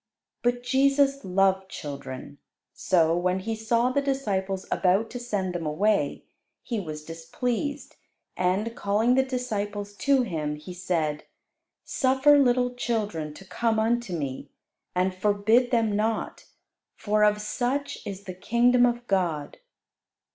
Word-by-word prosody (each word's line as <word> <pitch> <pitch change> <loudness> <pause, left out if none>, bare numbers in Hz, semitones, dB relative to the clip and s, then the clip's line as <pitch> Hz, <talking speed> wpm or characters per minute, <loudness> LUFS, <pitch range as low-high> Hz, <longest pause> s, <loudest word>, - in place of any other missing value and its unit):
But 245 0 0
Jesus 275 +2 +2
loved 190 0 +2
children. 140 -1 -7 0.3
So, 165 -3 +2
when 180 +1 +1
He 225 +3 -3
saw 230 +3 +1
the 280 - +1
disciples 200 -9 -1
about 195 +4 +2
to 245 - -5
send 205 -7 -2
them 170 -3 -3
away, 170 -1 +1 0.4
He 230 -3 -2
was 155 -5 -6
displeased; 245 - -4 0.4
and, 195 +6 0
calling 215 +5 +2
the 265 - +4
disciples 210 -6 -3
to 275 -2 +3
Him, 155 -8 -3
He 150 +4 -9
said, 165 -4 -2 0.6
"Suffer 270 +3 +4
little 250 -2 +3
children 210 -11 -2
to 195 - -12
come 225 +3 0
unto 230 -1 0
Me, 140 -5 -4 0.5
and 185 +1 +1
forbid 210 +5 +2
them 225 -4 +1
not: 220 +2 -2 0.5
for 210 0 +1
of 210 0 +4
such 250 +6 -2
is 195 0 -7
the 185 - -6
kingdom 245 +6 +3
of 240 0 -2
God." 175 - -1
210 Hz, 135 wpm, -26 LUFS, 180-245 Hz, 0.6 s, the